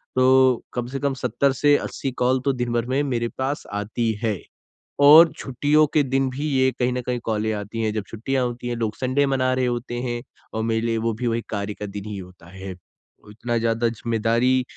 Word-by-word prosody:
तो 130 -1 +4
कम 120 -1 -3
से 135 +2 -4
कम 140 -1 0
70 130 +1 0
से 145 +2 +4
80 135 - -4
कॉल 130 +1 +3
तो 140 - +2
दिन 120 -1 -2
भर 120 -1 0
में 140 - +2
मेरे 120 -4 -1
पास 135 +2 -2
आती 110 +3 -1
हैं, 105 -5 0 0.6
और 155 +3 +9
छुट्टियों 145 +4 +2
के 150 - +4
दिन 135 0 0
भी 140 +4 -3
ये 130 -1 +3
कहीं 125 0 +2
ना 125 - -2
कहीं 125 -1 -1
कॉलें 110 0 0
आती 105 +2 -4
हैं। 110 - 0
जब 110 - -2
छुट्टियाँ 125 +4 -1
होती 120 0 -5
हैं, 120 - -2
लोग 110 -2 -2
संडे 130 +2 +1
मना 130 -2 +1
रहे 130 0 +1
होते 120 0 -3
हैं 120 -1 -3 0.3
और 110 - -2
मेरे 115 0 0
लिए 115 -1 0
वो 115 - +1
भी 120 +3 -3
वो 115 - +1
एक 115 - -5
कार्य 100 0 -3
का 105 - -7
दिन 100 0 -7
ही 105 - -5
होता 90 -2 -12
है। 95 +1 -8 0.6
इतना 120 +3 -3
ज़्यादा 115 +1 +1
ज़िम्मेदारी 115 +3 +1
120 Hz, 220 wpm, -23 LUFS, 110-130 Hz, 0.6 s, और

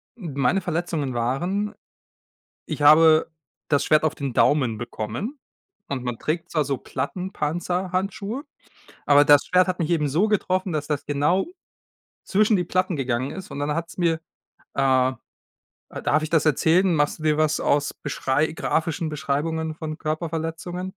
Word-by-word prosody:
meine 165 - 0
Verletzungen 165 -6 -2
waren 175 - -1 0.9
ich - - -5
habe 155 +2 +6 0.4
das 145 -2 +2
Schwert 155 0 +3
auf 155 - +1
den 140 -3 -4
Daumen 130 -7 +3
bekommen. 120 - -5 0.5
Und 130 -3 -4
man 120 -2 -3
trägt 165 +2 -3
zwar 155 -3 +1
so 135 -2 -2
Plattenpanzerhandschuhe, 185 - -3 0.6
aber 145 0 +6
das 145 -1 +6
Schwert 185 0 +3
hat 185 - -1
mich 165 - -1
eben 155 -3 +2
so 170 +10 +2
getroffen, 185 -3 0
dass 150 -1 -2
das 150 -2 -2
genau 150 +6 +1 0.8
zwischen 210 +1 +3
die 180 - 0
Platten 185 -1 0
gegangen 130 -1 -1
ist. 190 -4 -8
Und 140 - -5
dann 145 +1 -1
hat's 165 0 -5
mir, 165 -3 +1 0.6
äh 130 -1 +3 0.8
Äh, - - -5
darf 155 +1 +1
ich 155 - -3
das 165 -2 +2
erzählen? 165 +5 +3
Machst 150 +1 0
du 155 - -9
dir 155 -1 +2
was 155 -1 +2
aus 145 0 +1
Beschrei 145 +1 -1
grafischen 160 0 -1
Beschreibungen 155 +2 -2
von 155 -1 -6
Körperverletzungen? 165 +3 -4
155 Hz, 150 wpm, -24 LUFS, 145-180 Hz, 0.9 s, habe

